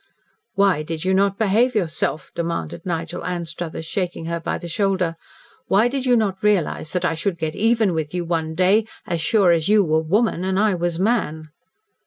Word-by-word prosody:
"Why 195 -6 +3
did 160 +2 -5
you 190 - +2
not 195 +1 +2
behave 225 +4 +2
yourself?" 155 -6 -1
demanded 165 - -4
Nigel 170 0 -3
Anstruthers, 170 -2 -5
shaking 175 -1 -3
her 170 0 -2
by 165 - -3
the 175 - -8
shoulder. 185 -1 0 0.5
"Why 210 +5 +4
did 260 +1 -2
you 245 - +5
not 195 -4 -1
realise 200 -6 +1
that 180 -1 0
I 180 - +1
should 170 +2 -2
get 160 -2 -3
even 225 -3 +2
with 155 -2 -2
you 180 -1 -3
one 160 -2 -2
day, 195 +5 +3 0.2
as 170 -2 -2
sure 195 0 +3
as 165 +1 +1
you 210 -1 +5
were 160 -2 +2
woman 190 +3 +1
and 190 0 0
I 215 -1 +3
was 175 -1 -1
man?" 170 -7 0
180 Hz, 190 wpm, -22 LUFS, 165-200 Hz, 0.5 s, you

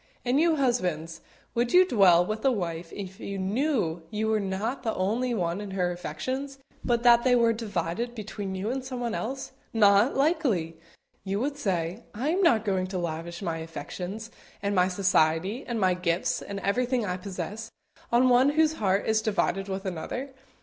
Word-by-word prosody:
And 250 +3 +2
you 330 0 +4
husbands, 180 - -1 0.3
would 240 0 0
you 365 +1 +8
dwell 185 - +5
with 215 +3 -4
a 270 - +4
wife 170 -6 -3
if 190 -1 -8
you 200 0 -5
knew 195 - 0
you 215 +2 -1
were 220 -1 +2
not 200 +6 -2
the 225 -3 -2
only 235 +6 0
one 175 -1 -1
in 205 - -6
her 180 -1 +1
affections, 255 - -4 0.3
but 240 -1 +1
that 235 -1 +6
they 250 -1 +4
were 230 -1 +4
divided 220 +1 -3
between 205 -3 -5
you 200 +5 -2
and 265 0 -3
someone 245 -3 -3
else? 265 +4 -4 0.2
"Not 205 +2 +5
likely!" 255 - +1 0.4
you 195 +1 -2
would 280 +4 -1
say; 185 - -2
"I 255 +8 -1
am 365 +4 +1
not 230 - +4
going 190 -2 0
to 185 0 -4
lavish 170 +1 -4
my 165 -3 -2
affections, 185 +6 -6 0.3
and 200 0 0
my 180 -2 +4
society, 185 - +1
and 235 -2 -2
my 185 -2 +3
gifts, 175 -1 0
and 200 0 -5
everything 245 +3 0
I 180 -2 -2
possess, 195 +3 -6 0.4
on 240 +2 +5
one 250 +2 +5
whose 315 0 +3
heart 195 0 +2
is 220 0 +2
divided 195 -2 0
with 195 +1 -4
another. 195 +10 -4
205 Hz, 180 wpm, -27 LUFS, 180-245 Hz, 0.4 s, you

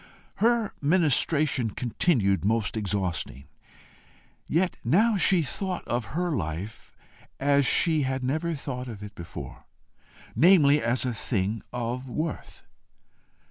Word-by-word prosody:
Her 230 0 +2
ministration 150 -5 +2
continued 110 - 0
most 110 +2 +1
exhausting. 95 - -3 1.0
Yet 175 +3 0
now 210 - +3
she 185 -3 +4
thought 185 +5 -4
of 120 +4 -3
her 175 -1 0
life 90 - -6 0.4
as 140 -1 +3
she 160 +1 +3
had 130 -1 -2
never 160 +6 -1
thought 130 -3 -6
of 105 -4 -8
it 105 -1 -9
before, 85 -4 -9 0.7
namely 150 -5 +5
as 120 +2 0
a 125 - -1
thing 110 -1 -2
of 125 +2 -4
worth. 155 +5 -5
130 Hz, 115 wpm, -26 LUFS, 110-165 Hz, 1.0 s, namely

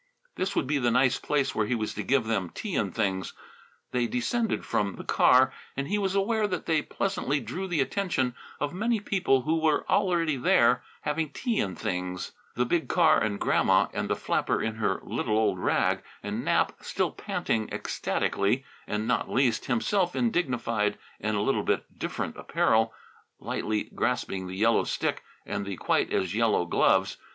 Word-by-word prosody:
This 195 +1 -2
would - - +1
be 145 +2 0
the 120 -2 +2
nice 125 +2 +3
place 145 -2 0
where 110 -1 0
he 125 - +1
was 110 -2 -2
to 105 - -4
give 135 +2 +2
them 100 -6 -1
tea 200 - -5
and 100 -4 0
things. 95 -5 -1 0.6
They 120 -1 +1
descended 220 - -1
from 100 -2 0
the - - -8
car, 130 +1 +5 0.2
and 140 0 -2
he 210 +1 0
was 195 -1 0
aware 210 +2 +2
that 180 -4 -3
they 160 -2 +2
pleasantly 150 -5 -1
drew 140 - -5
the 170 -6 +1
attention 140 -7 0 0.3
of 145 +2 -2
many 225 +4 0
people 180 -10 +1
who 160 +4 +1
were 155 -2 +2
already 170 -7 +2
there 125 0 +4 0.2
having 150 +1 -1
tea 235 - -1
and 95 -2 -1
things: 90 -3 -3 0.2
the 125 - +1
big 165 +6 0
car 160 -3 +4
and 100 -2 -1
Grandma - - +3
and - - -2
the - - +2
flapper - - 0
in 110 - -1
her 110 - 0
little 110 - -1
old 105 -4 +2
rag - - +1 0.2
and - - -3
Nap - - +2
still - - -1
panting 110 -1 -2
ecstatically, 120 +8 -1 0.2
and, 105 +1 -2
not 125 - 0
least, 130 -2 +1
himself 175 - +1
in 235 -2 +2
dignified 115 - 0 0.2
and 105 0 -1
a - - +1
little - - +1
bit - - 0
different - - -3
apparel, 110 0 +2 0.5
lightly 105 0 -2
grasping 95 -6 -1
the 95 +1 -6
yellow 115 +2 +3
stick - - -1 0.2
and - - -3
the 100 -2 -5
quite - - +1
as 95 -1 0
yellow 110 -5 +2
gloves. 85 - +2
125 Hz, 180 wpm, -27 LUFS, 110-170 Hz, 0.6 s, car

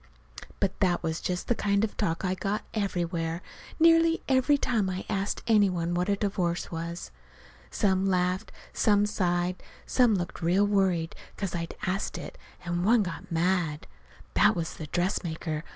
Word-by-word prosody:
But 195 -2 -1
that 180 -3 +2
was 160 0 -2
just 180 -1 -2
the - - +3
kind 200 -2 +1
of 220 - -2
talk 180 -3 -1
I 185 - +1
got, 200 +2 -2
everywhere, 175 -4 -2 0.4
nearly 330 0 +5
every 265 +2 +4
time 225 -8 0
I 185 0 -4
asked 195 +1 -2
any 210 -4 +5
one 175 -1 -1
what 180 +3 0
a 200 - +3
divorce 185 -4 -1
was. 170 +1 -5 0.6
Some 190 -1 +1
laughed, 180 0 0 0.2
and - - -28
some 205 -1 +4
sighed. 180 -3 0 0.2
Some 245 -4 +3
looked 175 -1 -4
real 180 +5 +3
worried 190 -5 +1 0.2
'cause 195 -3 -3
I'd 170 -1 -4
asked 190 +2 -2
it, - - -8 0.3
and 175 0 -1
one 220 +2 +4
got 180 +1 -7
mad. 165 -2 0 0.5
(That - - +5
was 165 -1 -3
the 155 - -7
dressmaker. 165 -2 -2
185 Hz, 165 wpm, -28 LUFS, 170-205 Hz, 0.6 s, nearly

